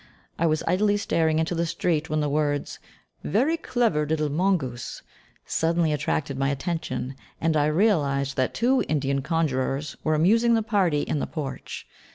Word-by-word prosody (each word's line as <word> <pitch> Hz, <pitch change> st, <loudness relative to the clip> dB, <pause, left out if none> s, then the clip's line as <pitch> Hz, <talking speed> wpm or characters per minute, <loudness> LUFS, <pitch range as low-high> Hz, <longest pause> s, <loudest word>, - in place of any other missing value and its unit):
I 165 Hz, -, +3 dB
was 155 Hz, 0 st, +1 dB
idly 205 Hz, +2 st, +2 dB
staring 160 Hz, -5 st, +1 dB
into 160 Hz, +3 st, 0 dB
the 170 Hz, 0 st, 0 dB
street 165 Hz, -2 st, -1 dB
when 155 Hz, 0 st, 0 dB
the 150 Hz, -, 0 dB
words, 145 Hz, 0 st, -1 dB, 0.4 s
"Very 265 Hz, -, +2 dB
clever 235 Hz, -, 0 dB
little 155 Hz, -1 st, 0 dB
mongoose," 150 Hz, -8 st, -1 dB, 0.4 s
suddenly 165 Hz, -1 st, +1 dB
attracted 145 Hz, -1 st, -2 dB
my 135 Hz, 0 st, +1 dB
attention, 140 Hz, -2 st, -3 dB, 0.3 s
and 160 Hz, -1 st, +1 dB
I 150 Hz, -1 st, +3 dB
realised 150 Hz, -6 st, +1 dB
that 130 Hz, -1 st, 0 dB
two 255 Hz, +3 st, +2 dB
Indian 140 Hz, -2 st, 0 dB
conjurers 140 Hz, -2 st, -1 dB
were 155 Hz, -1 st, +2 dB
amusing 230 Hz, +9 st, +4 dB
the 225 Hz, -, +1 dB
party 190 Hz, -9 st, +1 dB
in 150 Hz, -, -1 dB
the -, -, -2 dB
porch. 135 Hz, -5 st, -6 dB
155 Hz, 160 wpm, -25 LUFS, 145-180 Hz, 0.4 s, amusing